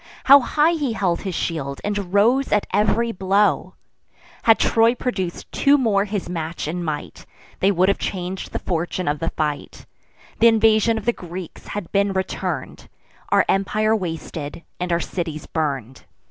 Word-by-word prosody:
How 280 +1 +9
high 300 +5 +2
he 290 -8 -1
held 180 -5 0
his 190 -4 -4
shield, 140 -5 -3
and 205 -3 -3
rose 235 +7 +3
at 210 - +2
ev'ry 225 +3 +2
blow! 195 +1 +1 0.7
Had 225 -1 +5
Troy 230 +1 +3
produc'd 190 -9 -3
two 285 +1 +4
more 210 -6 +2
his 205 -2 -4
match 165 -3 -4
in 175 +3 -3
might, 155 -3 -5 0.3
They 195 - +3
would 185 0 +2
have 200 - +1
chang'd 185 0 -4
the - - -2
fortune 175 0 -3
of 145 0 0
the 165 - -1
fight: 150 -2 -4 0.5
Th' 230 - +5
invasion 225 0 +4
of 220 - -6
the 240 - +2
Greeks 175 -2 -9
had 205 -5 -6
been 200 0 +2
return'd, 190 0 -4 0.4
Our - - +4
empire 215 +3 +1
wasted, 165 -4 -5 0.2
and 180 0 -2
our 170 - +2
cities 165 -4 -4
burn'd. 135 -6 -3
190 Hz, 160 wpm, -22 LUFS, 170-220 Hz, 0.7 s, How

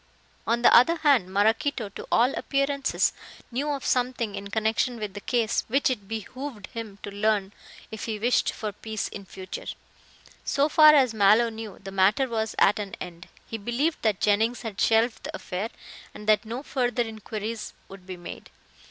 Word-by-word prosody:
On 235 +1 +1
the - - +7
other 330 +8 +6
hand, 275 - +3
Maraquito, 220 +4 +1
to - - -9
all 245 +3 +4
appearances, 275 0 0 0.4
knew 275 +5 -2
of 280 -2 -3
something 245 -4 0
in 200 0 -6
connection 220 +3 0
with 210 -3 -5
the 205 - -7
case 235 -1 0
which 270 +3 +2
it 205 -6 -5
behooved 225 +1 -6
him 220 -4 -6
to 205 - -6
learn 205 -1 0 0.4
if 220 - -6
he 220 -2 -3
wished 240 +4 +2
for 215 -1 -5
peace 215 +1 -5
in 200 - -9
the - - -27
future. 185 -1 -8 0.8
So 285 0 +2
far 305 0 +8
as 260 -5 +4
Mallow 215 +3 +5
knew, 220 -3 -8
the 195 0 -9
matter 195 +7 +3
was 220 -2 -2
at 205 - +4
an 200 -2 -5
end. 175 0 -8 0.2
He 225 - -6
believed 250 +10 -1
that 215 -4 +1
Jennings 220 +4 +1
had 215 -4 -5
shelved 225 +1 +2
the 305 +1 -5
affair, 195 -4 -4 0.5
and 210 - -10
that 215 +1 +4
no 235 +5 -5
further 245 -3 0
inquiries 220 0 -6
would 190 -1 -13
be 185 -1 -6
made. 175 - -9
225 Hz, 180 wpm, -26 LUFS, 205-250 Hz, 0.8 s, far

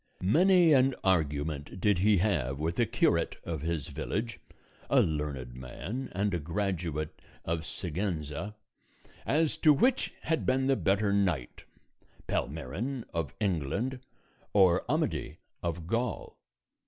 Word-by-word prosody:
Many 175 - +5
an 135 -1 +4
argument 75 -3 0
did 105 -1 +3
he 105 +2 +4
have 75 - +1
with 80 +3 -2
the - - +3
curate - - +2
of 80 -4 -4
his 80 -2 -2
village 115 +2 -3 0.5
(a - - +5
learned 75 -5 -1
man, 85 - -6
and 100 +1 0
a 85 - 0
graduate 80 -2 -3 0.2
of 80 -1 -2
Siguenza) 90 +1 -3 0.7
as 155 +2 +2
to 155 - +6
which 245 - +3
had 160 0 0
been 130 +1 +2
the 135 0 +3
better 100 -2 +1
knight, 90 -11 0 0.6
Palmerin 95 - -3
of 80 -5 -3
England 100 - -1 0.5
or 95 -4 +5
Amadis 75 - -1 0.3
of 85 -1 -3
Gaul. 115 +5 -2
90 Hz, 125 wpm, -30 LUFS, 75-115 Hz, 0.7 s, to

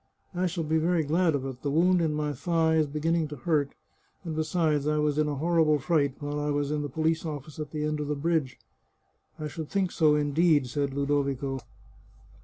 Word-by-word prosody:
" - - -44
I 180 +1 0
shall 170 -1 -3
be 160 +1 +1
very 170 0 +2
glad 165 +2 +2
of 135 -1 -2
it; 130 -2 -6
the 145 - -2
wound 175 +4 +3
in 160 -2 +1
my 150 -1 -1
thigh 165 0 +1
is 155 -1 +3
beginning 160 +2 0
to 150 - -7
hurt, 145 +1 0 0.5
and 165 -3 -4
besides, 155 -2 0
I 150 0 +1
was 150 0 +1
in 155 - +2
a 145 - -2
horrible 160 0 +3
fright 140 -2 +1
while 145 0 -3
I 150 0 -1
was 145 0 0
in 150 -1 -1
the 145 - -4
police 160 +3 0
office 150 -1 -6
at 150 -1 -4
the 150 0 -3
end 150 0 -1
of 150 - -3
the 150 - -1
bridge." 150 -4 -1 0.4
" - - -39
I 155 - -3
should 155 0 -6
think 190 -3 0
so 155 -2 +3
indeed," 150 0 +3
said 140 +2 -2
Ludovico. 140 -1 -1
150 Hz, 220 wpm, -27 LUFS, 145-160 Hz, 0.5 s, wound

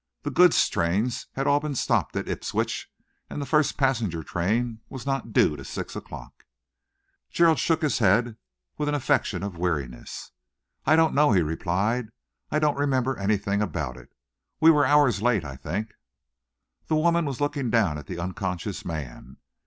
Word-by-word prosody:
The 145 - -3
goods 175 +5 +5
trains 100 +9 -1
had 135 - -2
all 145 +1 +4
been 150 -1 -4
stopped - - 0
at - - -2
Ipswich, - - -3 0.4
and - - -5
the 140 - -3
first 150 -1 +2
passenger 115 - 0
train 110 +8 -1
was 130 -2 -8
not 135 -4 -2
due 75 - +3
till 70 - -9
six 65 - -6
o'clock." - - -10 0.8
Gerald 165 -3 +3
shook 165 -1 +1
his 150 - +1
head 110 +2 +3 0.4
with 150 - 0
an 150 - 0
affectation 135 -7 0
of 95 -4 -5
weariness. 70 -9 -4 0.6
"I 155 - +6
don't 160 -1 +3
know," 145 -4 +4
he 90 -3 +4
replied. 95 +9 -1 0.4
"I 150 - 0
don't 150 -2 +1
remember 135 -2 +1
anything 100 0 0
about 80 -11 -3
it. 60 -1 -15 0.5
We 160 +1 +7
were 145 -3 +3
hours 140 -8 +4
late, 115 -8 +2
I 70 -2 -7
think." 90 +11 -4 1.0
The 155 - +1
woman 170 +1 +2
was 135 -4 -4
looking 145 -3 -1
down 105 -11 +2
at 75 - -12
the - - -6
unconscious 90 +2 -4
man. 65 -6 -7
115 Hz, 170 wpm, -25 LUFS, 90-145 Hz, 1.0 s, We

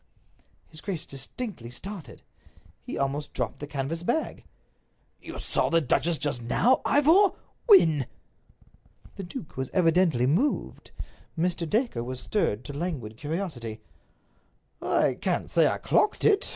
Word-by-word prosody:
His 155 - -12
grace 185 -6 -4
distinctly 135 - -6
started. 180 +8 -8 0.6
He - - -6
almost 140 +2 -2
dropped - - -3
the 145 - -6
canvas 145 +4 -3
bag. 240 - -2 0.7
"You - - -8
saw - - 0
the 165 - +4
duchess 165 +3 +1
just 140 -5 -1
now, 235 - +3
Ivor! 330 +8 +5 0.3
When?" 160 - +6 1.1
The 195 - -5
duke 180 - -8
was 130 -1 -2
evidently 165 -7 +3
moved. 180 - 0 0.5
Mr. 170 -1 0
Dacre 220 - 0
was 130 +1 -5
stirred 125 - 0
to 145 - -6
languid 140 -9 -4
curiosity. 145 - -4 1.0
"I - - +1
can't - - -1
say - - +5
I - - 0
clocked 425 - +1
it. 410 -2 +4
160 Hz, 130 wpm, -27 LUFS, 135-200 Hz, 1.1 s, When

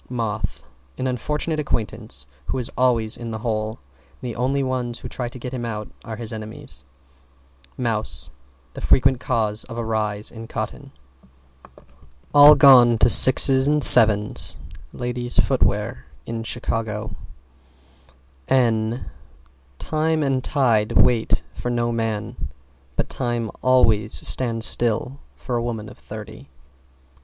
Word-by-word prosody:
=MOTH= 110 -4 -4 0.3
An 130 - -4
unfortunate 150 +5 -3
acquaintance 105 - -4 0.2
who - - -3
is 125 -2 -4
always 120 -3 +1
in 120 -1 -8
the 110 - -5
hole. 110 -1 -3
And 70 - -13
the - - -10
only 135 +3 -1
ones 125 -2 -3
who - - -9
try 125 -2 -6
to 125 - -11
get 125 +1 -8
him 125 -2 -5
out 105 -2 -6
are 115 -2 -7
his 115 0 -7
enemies. 105 -12 -6 0.9
=MOUSE= 105 - -3 0.4
The - - -9
frequent 130 -1 +2
cause 110 -5 -1
of 115 -1 -10
a 120 - -4
rise 105 -1 -1
in 115 -1 -10
cotton. 120 +5 -7 1.4
All 145 +1 +8
gone 125 -4 +6
to 110 - +3
6's 130 +2 +8
and 150 0 +1
7's 105 -8 +7 0.3
Ladies' 120 0 -5
Footwear 65 +1 -1 0.2
in 115 0 -5
Chicago. 110 -2 -4 1.3
N 115 -2 0 0.7
Time 155 - -2
and 135 -2 -1
tide 115 -7 0
wait 115 -2 +1
for 120 - -6
no 120 -1 -1
man 110 - -4 0.5
But - - -2
time 120 -3 -4
always 110 -4 +1
stands 115 -3 +1
still 120 +4 +2 0.2
for 125 -2 -5
a 120 - -3
woman 110 -3 -5
of - - -16
thirty. 70 - -11
115 Hz, 130 wpm, -21 LUFS, 110-130 Hz, 1.4 s, All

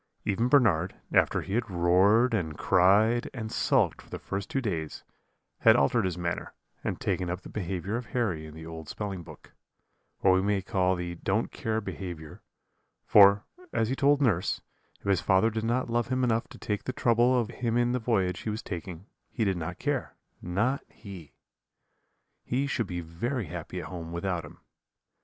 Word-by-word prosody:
Even 115 +5 +1
Bernard, 100 - +3 0.2
after - - +3
he 95 - -6
had 115 -1 0
roared, 95 +7 +4
and 80 -8 -1
cried, 105 +6 +4
and 110 -3 -5
sulked - - +2
for - - -19
the - - -5
first 100 0 -5
two 135 - 0
days, 85 - -3 0.6
had - - +6
altered 95 - +3
his 90 -2 -2
manner, 85 0 -3 0.3
and - - -2
taken 90 -2 -1
up 90 +1 -3
the - - -11
behaviour 95 +1 -3
of 120 0 -6
Harry 95 -11 -1
in 75 - -11
the 80 0 -9
old 80 -1 -8
spelling 100 -4 -4
book - - -14 0.7
what 95 - +5
we 95 - +3
may 100 0 +1
call 95 -1 +1
the 90 -1 -4
don't 95 +6 -1
care 110 0 -2
behaviour 85 -7 -7 0.6
for, 100 0 +7 0.3
as 110 - 0
he 130 - 0
told 145 +1 +3
nurse, 95 -8 +1 0.4
if - - -24
his 100 -3 +2
father 95 +5 +3
did 110 0 -3
not 120 +3 0
love 120 0 0
him 130 0 0
enough 115 -2 +1
to - - -13
take 105 -1 -3
the 130 - -2
trouble 120 +1 +3
of 115 - -2
him 120 -1 +1
in 120 0 +2
the 125 - 0
voyage 95 -6 0
he - - -4
was 110 +1 -4
taking, 90 -1 -6 0.2
he 115 - -1
did 95 -2 +1
not 80 -2 -5
care, - - -2 0.3
not 110 +10 0
he; 95 -8 -11 1.1
he 130 +3 0
should 120 -6 -1
be 90 -1 -4
very 105 +9 -3
happy 75 - -6
at - - -6
home 85 -3 -7
without 85 0 -2
him. 75 - -13
100 Hz, 190 wpm, -28 LUFS, 90-115 Hz, 1.1 s, for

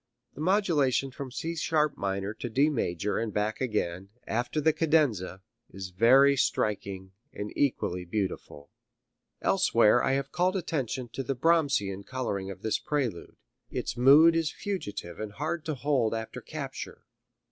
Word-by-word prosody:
The 145 - -9
modulation 155 -8 +2
from 135 +1 -7
C 165 +7 -4
sharp 155 -3 +1
minor 100 -2 -2
to 120 +2 -6
D 140 +7 +3
major 100 - -1
and 115 -1 -2
back 105 +3 -2
again 95 -6 -2 0.2
after 120 +6 -1
the 155 +1 +3
cadenza 130 - +1 0.3
is 95 -1 -8
very 130 +8 +6
striking 100 -6 -1 0.2
and 105 0 -6
equally 90 -10 0
beautiful." 90 -6 -4 0.7
Elsewhere 120 - +4
I - - +2
have 135 +1 -2
called 180 +2 +1
attention 135 - -2
to 135 - -5
the 135 +1 -2
Brahmsian 140 - +1
coloring 100 -6 -3
of 95 0 -9
this 110 - 0
prelude. 130 - -3 0.3
Its - - -3
mood 145 +7 +7
is 165 -2 +1
fugitive 140 - -5
and 110 -1 -5
hard 155 +5 -3
to 155 -2 -2
hold 130 -5 +1
after 110 0 -6
capture. - - -7
125 Hz, 145 wpm, -28 LUFS, 105-150 Hz, 0.7 s, mood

